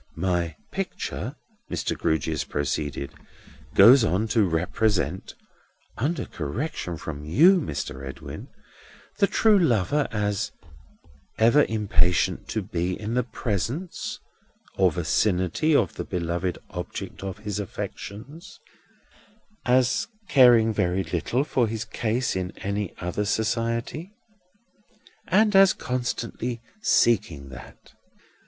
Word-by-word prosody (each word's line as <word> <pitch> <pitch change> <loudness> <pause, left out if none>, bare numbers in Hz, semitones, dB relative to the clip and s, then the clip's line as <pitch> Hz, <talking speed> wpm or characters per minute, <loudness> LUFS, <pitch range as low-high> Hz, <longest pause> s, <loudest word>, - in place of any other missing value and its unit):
"My 85 -2 0 0.2
picture," - - -4 0.3
Mr. - - -2
Grewgious 80 -1 0
proceeded, 75 -1 -3 0.6
"goes 120 +6 +8
on 110 +1 +1
to 110 -2 +3
represent 90 +2 -1 0.6
(under 155 +8 -1
correction 90 - -4
from 75 -2 -6
you, 165 - +5
Mr. 70 - -5
Edwin), 65 0 -8 0.7
the 200 - +5
true 215 -1 +4
lover 140 - +2
as 105 -2 -1 0.9
ever 120 +7 +5
impatient 100 -5 +1
to - - -2
be 90 +2 -2
in 110 +2 -4
the 125 - +3
presence 120 - -3 0.6
or 95 -2 +4
vicinity 90 - +1
of 100 - +2
the - - -5
beloved 85 +1 -2
object - - -6
of 95 0 -5
his 105 -1 -4
affections; 125 - -7 1.1
as 125 0 +3 0.2
caring 120 -4 +6
very 90 -1 0
little 90 - -1
for 125 -5 +1
his 110 0 -4
case 120 +1 -1
in 95 0 -4
any 100 -1 -3
other 90 +4 -2
society; 115 - -2 1.1
and 215 -1 +3
as 195 0 +7
constantly 120 -1 -3 0.2
seeking 85 - +2
that. 65 - -13
105 Hz, 105 wpm, -25 LUFS, 90-125 Hz, 1.1 s, goes